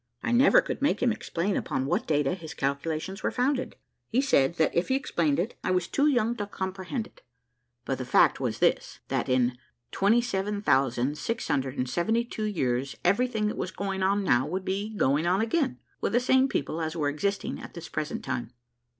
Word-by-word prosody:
I 240 - -1
never 245 +3 +6
could - - -5
make 285 -2 +1
him 245 - +4
explain 195 -2 -2
upon 130 0 -1
what - - -1
data 145 -3 +2
his 165 -4 -8
calculations 155 +7 -2
were - - +1
founded; 260 +1 -1 0.3
he 240 - +2
said, 170 - +3
that 160 -2 +2
if 170 - +1
he 265 - +2
explained 165 - 0
it, 195 +8 -1
I - - -1
was 180 -1 +1
too 285 +1 +2
young 240 -5 +2
to 205 - -3
comprehend 190 +4 -4
it; - - -19 0.6
but 135 0 -2
the 130 - -3
fact 125 - +4
was - - -2
this, - - +1
that - - -1
"in 125 -1 +2 0.3
27,672 190 - 0
years 135 -9 -1
everything 220 +3 +2
that 210 - -1
was - - -2
going 195 0 -3
on 200 +2 +2
now 125 -8 +3
would 185 +3 -3
be 200 +3 -2
going 145 +3 +2
on 185 +2 +3
again, 260 +5 0 0.2
with - - -1
the 240 - +5
same 260 +1 +4
people 160 - -2
as 160 +1 -3
were 150 -3 0
existing 195 +8 -2
at - - -10
this 170 -1 -7
present 155 0 -4
time." 120 -2 -3
185 Hz, 185 wpm, -27 LUFS, 145-225 Hz, 0.6 s, never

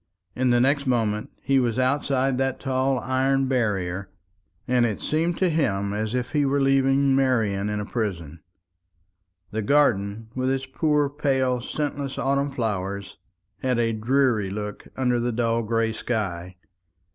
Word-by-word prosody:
In 130 0 +1
the 120 0 +4
next 140 +2 +2
moment 110 -4 0
he 135 0 +3
was 120 -3 0
outside 130 0 +1
that 135 -1 0
tall 130 0 0
iron 135 +1 +1
barrier; 100 -7 -1 0.6
and 125 -1 +3
it 110 -4 0
seemed 165 +2 0
to 185 - +2
him 100 -11 0
as 110 +3 -2
if 125 -1 -2
he 150 -2 +2
were 140 +1 +1
leaving 135 0 +3
Marian 110 -7 +1
in 105 0 -2
a 105 - -3
prison. 85 -9 -4 1.1
The 110 +1 -2
garden, 110 -4 +1
with 130 0 -1
its 135 0 -1
poor 150 +2 +1
pale 130 -3 0
scentless 140 +1 -3
autumn 140 +1 +1
flowers, 100 -6 -3 0.4
had 130 -2 +1
a 115 -1 +1
dreary 115 -2 +1
look 105 +1 -6
under 125 -2 +1
the 120 +1 0
dull 115 0 0
gray 115 0 0
sky. 95 -7 -3
125 Hz, 150 wpm, -24 LUFS, 105-135 Hz, 1.1 s, the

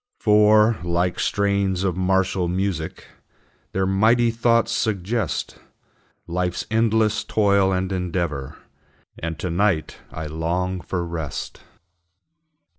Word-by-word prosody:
For, 105 0 +4
like 85 +1 0
strains 100 -2 0
of 95 -3 0
martial 95 0 +1
music, 90 -1 -3 0.7
Their 95 0 0
mighty 110 +5 +3
thoughts 115 0 +2
suggest 110 -1 -2 0.7
Life's 90 +1 -2
endless 110 -1 +2
toil 100 -2 +2
and 95 0 -1
endeavor; 85 -7 -3 0.6
And 80 -1 -4
to 90 - -3
night 90 -3 0
I 80 - -6
long 85 +4 -2
for 90 -1 -3
rest. 80 -5 -5
95 Hz, 105 wpm, -22 LUFS, 85-105 Hz, 0.7 s, For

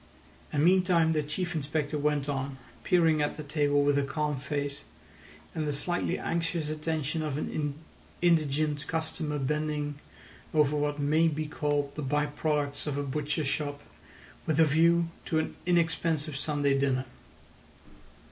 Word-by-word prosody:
And 150 +1 +2
meantime 180 -3 +4
the 155 -1 +2
Chief 170 +4 -3
Inspector 150 -1 -2
went 145 -1 +1
on, 135 -1 -2 0.3
peering 165 -4 +4
at 150 - -1
the 155 - -5
table 145 -1 +2
with 145 0 +3
a - - +1
calm 150 +1 -1
face 140 +1 -3 0.7
and 155 -1 -2
the 145 - 0
slightly 175 +5 0
anxious 165 -2 -1
attention 155 0 -2
of 150 -3 -2
an 150 -1 -2 0.4
indigent 155 -3 +2
customer 160 -2 -2
bending 150 +1 -1 0.6
over 150 -1 +4
what 145 0 0
may 155 +3 +3
be 155 0 -1
called 145 -1 -1
the 150 - -5
by 145 +2 +1
products 145 -1 -1
of 145 -1 -1
a 145 - -1
butcher's 150 +2 -2
shop 145 0 -2 0.6
with 155 -1 +1
a 160 - +8
view 165 +3 +4 0.2
to 160 - 0
an 160 - -1
inexpensive 165 -3 +1
Sunday 145 -1 +1
dinner. 135 -1 +1
150 Hz, 145 wpm, -29 LUFS, 145-160 Hz, 0.7 s, a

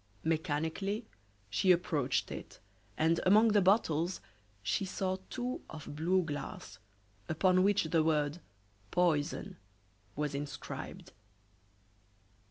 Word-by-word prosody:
Mechanically 160 +7 -1 0.4
she 185 - +3
approached 150 -7 +1
it, - - -8 0.4
and 165 +1 +3
among 215 +4 +6
the 205 -1 +4
bottles 180 -3 +2 0.4
she 95 - 0
saw 185 0 -1
two 250 +1 -3
of 155 -2 -8
blue 180 +4 +2
glass, 145 -4 -6 0.5
upon 185 +3 +3
which 200 +1 +3
the 160 0 +2
word 150 0 +1 0.5
"poison" 175 +2 0 0.6
was 150 0 -1
inscribed. 145 0 -6
165 Hz, 100 wpm, -33 LUFS, 150-190 Hz, 0.6 s, among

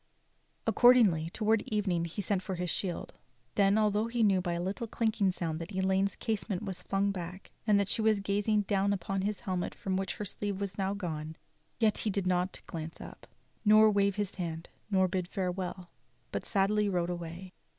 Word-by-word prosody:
Accordingly, 215 -11 +5
towards 215 +3 +1
evening, 190 -6 0
he 175 +5 -4
sent 190 0 0
for 190 0 -4
his 180 -1 -2
shield; 180 -4 -3 0.4
then, 200 +1 +4
although 215 +1 +2
he 230 0 0
knew 195 -3 +4
by 175 -1 -2
a 170 - -2
little 195 +7 -3
clinking 220 -3 +1
sound 165 -3 -3
that 165 +5 -7
Elaine's 190 +1 +1
casement 210 -3 -2
was 190 -3 -5
flung 200 +2 0
back, 180 0 -7 0.2
and 205 -1 +5
that 200 - +1
she 225 - 0
was 220 -1 +3
gazing 205 +2 +1
down 200 0 +1
upon 195 0 -2
his 205 +1 -2
helmet 185 -6 -2
from 190 -1 -2
which 195 0 -2
her 210 - -4
sleeve 200 0 -2
was 200 -2 -3
now 195 0 -1
gone, 160 -5 -4 0.4
yet 220 -3 +3
he 220 - 0
did 195 -1 -1
not 180 0 0
glance 160 -1 -6
up, - - -11 0.4
nor 215 0 +7
wave 200 -1 +2
his 205 -2 -2
hand, 165 -2 -5 0.2
nor 190 -2 +3
bid 185 -1 -2
farewell, 180 -2 -3 0.4
but - - -3
sadly 205 +1 +2
rode 175 -2 0
away. 175 +2 -7
195 Hz, 190 wpm, -31 LUFS, 180-210 Hz, 0.4 s, nor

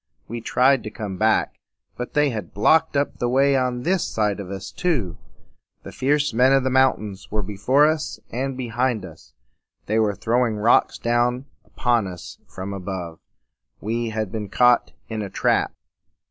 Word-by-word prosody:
We 120 +1 -5
tried 130 +3 +3
to 110 - -6
come 105 -4 -6
back; 110 +2 +1 0.4
but 125 - -6
they 150 -2 +3
had 105 -7 -6
blocked 160 +8 +3
up 140 - -1
the 120 - 0
way 135 +2 +3
on 125 -2 0
this 185 +1 +1
side 105 -2 -1
of 95 -2 -7
us 95 0 -6
too. 135 - -1 0.7
The - - -9
fierce 145 0 +1
men 125 +4 +4
of 135 -1 +3
the 130 - 0
mountains 110 -7 +1
were 105 0 -2
before 105 +9 +2
us 155 0 -1
and 130 +2 -3
behind 120 -3 -1
us, 80 -4 -14 0.5
and - - -40
they 110 +2 +1
were 105 -2 +1
throwing 115 +2 +1
rocks 110 +3 +3
down 120 +2 0 0.2
upon 120 -5 0
us 90 -2 -9
from 95 +2 -6
above. 90 -3 -6 0.6
We 115 +2 -2
had 110 -3 -3
been 105 -2 -4
caught 125 +3 +3 0.2
in 110 -1 -4
a 100 - -5
trap. - - +1
120 Hz, 175 wpm, -23 LUFS, 105-130 Hz, 0.7 s, men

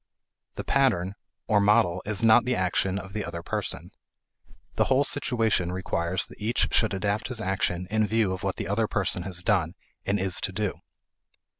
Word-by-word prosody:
The - - -4
"pattern" 105 -10 +1 0.3
or 105 -1 +3
model 100 -4 +3
is 105 0 -2
not 115 +1 +6
the 125 0 0
action 95 0 0
of 95 0 -7
the 105 - -2
other 85 +1 -6
person. - - -4 0.8
The - - +2
whole 135 +1 +3
situation 115 -9 +1
requires 90 0 -1
that - - -15
each 115 +3 0
should 110 -3 +2
adapt 105 +2 -1
his 125 -3 -3
action 95 -3 -1
in 110 -1 +2
view 110 -3 +1
of 95 - -6
what - - -2
the - - -4
other 105 +3 +1
person 95 -3 0
has 90 -1 -4
done - - +1 0.3
and 100 +1 0
is 95 -1 +1
to - - -1
do. 105 0 -3
100 Hz, 180 wpm, -26 LUFS, 95-110 Hz, 0.8 s, not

